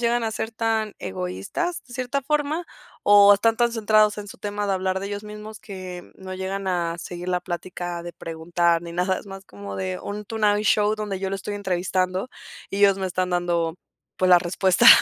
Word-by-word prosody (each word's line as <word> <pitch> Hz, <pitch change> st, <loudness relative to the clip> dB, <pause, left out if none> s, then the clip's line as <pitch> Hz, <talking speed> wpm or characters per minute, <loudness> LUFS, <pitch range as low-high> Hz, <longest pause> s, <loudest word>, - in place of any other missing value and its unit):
llegan 240 Hz, 0 st, +2 dB
a 225 Hz, -, 0 dB
ser 220 Hz, +1 st, -3 dB
tan 220 Hz, -1 st, 0 dB
egoístas 95 Hz, -, -3 dB
de 250 Hz, -, -15 dB
cierta 255 Hz, +2 st, -2 dB
forma, 300 Hz, +4 st, 0 dB, 0.4 s
o 205 Hz, 0 st, +8 dB
están 225 Hz, +3 st, +2 dB
tan 240 Hz, -1 st, +3 dB
centrados 215 Hz, -2 st, +4 dB
en 210 Hz, -1 st, -6 dB
su -, -, -11 dB
tema 205 Hz, 0 st, -3 dB
de 200 Hz, -, +1 dB
hablar 190 Hz, 0 st, -1 dB
de 195 Hz, -, -4 dB
ellos 205 Hz, 0 st, -4 dB
mismos 210 Hz, 0 st, -8 dB
que, 185 Hz, -4 st, -7 dB
mm, -, -, -17 dB
no 185 Hz, 0 st, -5 dB
llegan 190 Hz, +1 st, -3 dB
a 170 Hz, -2 st, 0 dB
seguir 175 Hz, +1 st, -6 dB
la 180 Hz, -1 st, +1 dB
plática 175 Hz, 0 st, -5 dB
de 175 Hz, -, -6 dB
preguntar 165 Hz, +1 st, 0 dB
ni 170 Hz, 0 st, -8 dB
nada, 180 Hz, +2 st, +1 dB
es -, -, -12 dB
más 195 Hz, 0 st, -9 dB
como 100 Hz, -, -8 dB
de 95 Hz, -1 st, -2 dB
un 210 Hz, +1 st, -5 dB
tonight 210 Hz, -1 st, +1 dB
show 210 Hz, +1 st, +3 dB
donde 210 Hz, -3 st, -3 dB
yo 190 Hz, 0 st, -2 dB
lo -, -, -1 dB
estoy 200 Hz, +2 st, -5 dB
entrevistando 185 Hz, +2 st, -1 dB, 0.4 s
y 195 Hz, -, -3 dB
ellos 200 Hz, -1 st, +6 dB
me 190 Hz, -1 st, -2 dB
están 185 Hz, 0 st, -1 dB
dando, 175 Hz, -2 st, 0 dB, 0.4 s
pues, 185 Hz, -, +2 dB
las 175 Hz, -1 st, +8 dB
respuestas. 180 Hz, +1 st, +4 dB
195 Hz, 210 wpm, -24 LUFS, 175-215 Hz, 0.4 s, o